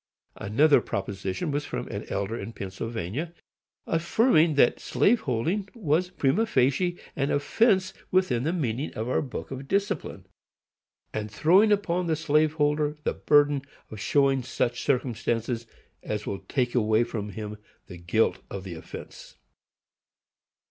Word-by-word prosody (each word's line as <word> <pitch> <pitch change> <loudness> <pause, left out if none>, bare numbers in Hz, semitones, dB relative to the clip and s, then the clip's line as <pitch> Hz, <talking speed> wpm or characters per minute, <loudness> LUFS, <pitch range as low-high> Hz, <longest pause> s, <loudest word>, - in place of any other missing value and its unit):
Another 140 +9 +4
proposition 100 - -3
was 145 +1 -1
from - - -4
an - - -5
elder 100 +3 -2
in 115 0 -6
Pennsylvania, 115 - -5 0.5
affirming 165 - +3
"that 130 -4 +4
slaveholding 195 - +1
was, 180 -4 +1
prima 180 +5 +1
facie, 140 +5 +2 0.2
an 140 0 0
offence 185 +6 +2 0.2
within 185 -11 +2
the 155 +6 0
meaning 140 -5 -2
of 110 +2 -3
our 130 - +1
Book 135 -1 -6
of 135 +1 -6
Discipline, 200 -1 -2 0.9
and 110 0 -3
throwing 185 - +4
upon 180 -3 +1
the 160 - +2
slave 155 0 +2
holder 150 0 +1
the - - 0
burden 145 -1 +3 0.3
of 110 - -7
showing 135 +2 +2
such 125 -1 -2
circumstances 120 -3 -1 0.3
as 105 0 -4
will 100 - -3
take 125 -3 0
away 110 -1 +3
from 105 -3 -4
him 105 +1 -7 0.3
the 90 - -10
guilt 85 +6 +1
of 100 -1 -6
the 95 -2 -6
offence." 80 - -10
140 Hz, 135 wpm, -27 LUFS, 110-165 Hz, 0.9 s, Another